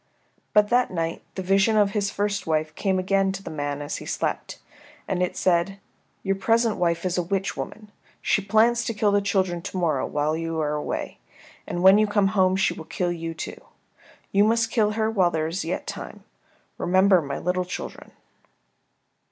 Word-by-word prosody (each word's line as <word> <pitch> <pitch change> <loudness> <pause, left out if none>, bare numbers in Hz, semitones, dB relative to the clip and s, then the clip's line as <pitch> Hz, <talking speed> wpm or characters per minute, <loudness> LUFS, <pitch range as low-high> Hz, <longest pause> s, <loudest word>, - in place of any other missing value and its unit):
But 210 0 +5
that 245 +1 +3
night 165 -2 -3
the 190 - -4
vision 195 +4 +3
of 205 -1 +4
his 200 -1 0
first 205 -1 -2
wife 155 -1 0
came 190 +3 0
again 195 +1 +1
to 195 0 -7
the - - -7
man 145 -1 -3
as 145 - -4
he - - -9
slept, - - -3 0.5
and 180 - -1
it 180 - -1
said, 185 +2 +1 0.5
"Your 195 0 0
present 230 +2 +2
wife 170 0 0
is 180 0 0
a - - +2
witch 195 +2 -2
woman. 210 -1 -7 0.3
She 205 - +1
plans 225 +4 +3
to 230 - -2
kill 205 -1 +2
the 205 0 +3
children 190 -3 0
to 185 - -6
morrow 160 -7 0
when 150 +2 -1
you 165 -1 -3
are 150 -1 0
away, 150 - -4 0.5
and 175 - -3
when 190 +2 +8
you 215 - +3
come 205 -1 +2
home 190 -2 +3
she 195 - +2
will 160 - -9
kill 175 +1 -2
you, 165 -1 -5
too. - - -7 0.7
You 200 +1 +4
must 225 +1 +2
kill 215 -2 +2
her 220 0 0
while 190 -5 +3
there 160 -2 -1
is 165 +4 -3
yet 165 +3 -3
time. - - -7 0.6
Remember 185 0 +4
my 140 -2 -4
little 180 +1 -1
children." 180 - -7
190 Hz, 195 wpm, -24 LUFS, 170-205 Hz, 0.7 s, when